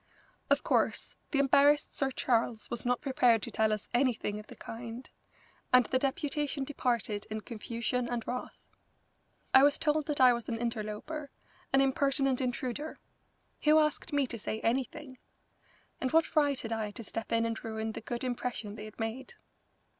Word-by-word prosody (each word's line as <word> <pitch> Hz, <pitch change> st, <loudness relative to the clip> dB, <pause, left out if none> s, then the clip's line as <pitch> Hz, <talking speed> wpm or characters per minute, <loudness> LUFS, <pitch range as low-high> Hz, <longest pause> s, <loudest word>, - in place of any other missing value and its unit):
Of -, -, +3 dB
course, -, -, +1 dB, 0.2 s
the 290 Hz, -, 0 dB
embarrassed 280 Hz, +2 st, +4 dB
Sir 275 Hz, -, +1 dB
Charles 235 Hz, -3 st, 0 dB
was 240 Hz, 0 st, -3 dB
not 245 Hz, 0 st, +1 dB
prepared 250 Hz, -5 st, +3 dB
to 235 Hz, -, -5 dB
tell 220 Hz, 0 st, +2 dB
us 210 Hz, -1 st, -2 dB
anything 240 Hz, -4 st, +1 dB
of 210 Hz, -, -11 dB
the -, -, -11 dB
kind, 235 Hz, +2 st, -8 dB, 0.6 s
and 250 Hz, -1 st, +7 dB
the 260 Hz, -, +1 dB
deputation 280 Hz, +1 st, -1 dB
departed 235 Hz, -7 st, -1 dB
in 215 Hz, 0 st, -4 dB
confusion 235 Hz, +2 st, -2 dB
and 240 Hz, -2 st, -2 dB
wrath. 250 Hz, +1 st, -4 dB, 1.0 s
I 265 Hz, -, +9 dB
was 285 Hz, +1 st, +5 dB
told 305 Hz, -1 st, +1 dB
that 295 Hz, -2 st, -1 dB
I 255 Hz, -1 st, +8 dB
was 235 Hz, -2 st, -4 dB
an 230 Hz, -, -1 dB
interloper, 235 Hz, +6 st, -4 dB, 0.4 s
an 270 Hz, -, +5 dB
impertinent 270 Hz, 0 st, +2 dB
intruder. 255 Hz, +4 st, -3 dB, 0.7 s
Who 305 Hz, +1 st, +7 dB
asked 305 Hz, +1 st, +1 dB
me 285 Hz, -2 st, +2 dB
to 235 Hz, -2 st, -5 dB
say 215 Hz, +1 st, -3 dB
anything? 265 Hz, +3 st, -2 dB, 0.8 s
And 260 Hz, -, -1 dB
what 325 Hz, 0 st, +3 dB
right 285 Hz, -3 st, +3 dB
had 225 Hz, -, -5 dB
I 220 Hz, -2 st, -2 dB
to 220 Hz, +3 st, -8 dB
step 225 Hz, +1 st, -5 dB
in 230 Hz, 0 st, +2 dB
and 230 Hz, 0 st, -3 dB
ruin 220 Hz, 0 st, -3 dB
the -, -, -7 dB
good 235 Hz, +2 st, -4 dB
impression 240 Hz, -4 st, -3 dB
they 210 Hz, -, -7 dB
had 215 Hz, +1 st, -12 dB
made? 225 Hz, +4 st, -4 dB
250 Hz, 170 wpm, -31 LUFS, 225-275 Hz, 1.0 s, I